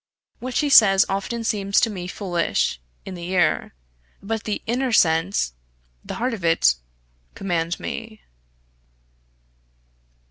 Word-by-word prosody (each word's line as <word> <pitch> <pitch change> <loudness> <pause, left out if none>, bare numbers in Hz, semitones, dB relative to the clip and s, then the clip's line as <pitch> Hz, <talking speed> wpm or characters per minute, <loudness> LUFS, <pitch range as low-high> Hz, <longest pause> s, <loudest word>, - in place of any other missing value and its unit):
What 255 +1 -6
she 295 - +2
says 195 -8 +7
often 200 +4 -3
seems 200 -3 +1
to 230 - +2
me 180 -3 -6
foolish 175 - -1 0.2
in 190 - -7
the 175 -1 -7
ear; 175 - +1 0.4
but 220 +2 -4
the 210 - -3
inner 250 +2 -1
sense, 165 - +2 0.5
the - - -6
heart 245 +1 -1
of 205 -6 -6
it, 165 - +4 0.6
command 175 -3 -2
me. 225 -2 -6
195 Hz, 120 wpm, -23 LUFS, 175-225 Hz, 0.6 s, says